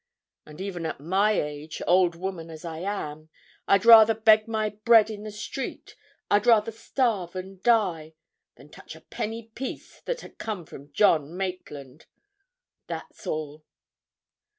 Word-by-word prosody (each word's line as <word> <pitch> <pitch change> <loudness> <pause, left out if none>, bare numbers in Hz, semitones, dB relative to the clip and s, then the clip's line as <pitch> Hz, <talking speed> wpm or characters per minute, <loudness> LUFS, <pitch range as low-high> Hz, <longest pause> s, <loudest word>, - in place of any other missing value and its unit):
And 150 0 -13
even 185 -4 -4
at 155 - -6
my 190 +8 +2
age, 150 -3 -4
old 180 -1 +3
woman 175 -2 -6
as 160 +1 -10
I 160 -1 -6
am, 155 -5 -5 0.4
I'd 200 +1 +3
rather 225 -1 +9
beg 215 0 +4
my 220 -1 -1
bread 220 +1 +4
in 205 -1 -7
the 215 0 -7
street, 210 +5 -7 0.3
I'd 205 +3 +2
rather 225 -1 +4
starve 220 -6 -2
and 185 0 -8
die, 180 -10 +1 0.4
than - - -17
touch - - -12
a - - -15
penny 225 +1 -6
piece 265 +3 -7
that - - -3
had - - -14
come 205 -6 -5
from 145 -1 -13
John 160 -1 +2
Maitland! 155 -7 -7 0.8
That's - - -8
all." 155 0 -4
190 Hz, 150 wpm, -26 LUFS, 160-215 Hz, 0.8 s, rather